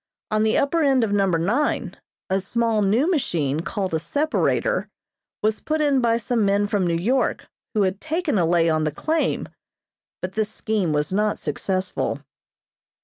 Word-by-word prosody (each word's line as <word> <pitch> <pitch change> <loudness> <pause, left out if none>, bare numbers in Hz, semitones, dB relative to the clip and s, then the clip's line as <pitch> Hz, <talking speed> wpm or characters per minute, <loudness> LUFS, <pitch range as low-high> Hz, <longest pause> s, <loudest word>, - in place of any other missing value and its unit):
On 215 0 +2
the 220 0 +2
upper 325 +4 +2
end 270 -4 +3
of 215 - 0
Number 195 -4 +2
Nine 230 - 0 0.3
a 190 +1 0
small 225 +2 0
new 215 +9 +2
machine 155 - 0
called 190 +1 -3
a 160 - +1
separator 310 - 0 0.5
was 215 0 +1
put 310 0 -2
in 285 -3 +3
by 230 -1 +3
some 235 -1 0
men 200 +1 +2
from 205 -3 0
New 170 - +1
York 245 +10 0 0.3
who 210 - +3
had 190 +1 -1
taken 315 - 0
a 170 - +3
lay 170 -1 +3
on 155 -1 +2
the 155 - 0
claim; 315 - -1 0.7
but 185 +1 -5
this 215 0 0
scheme 215 -5 -1
was 150 +1 0
not 210 +1 +1
successful. 185 -6 -2
210 Hz, 170 wpm, -23 LUFS, 185-255 Hz, 0.7 s, end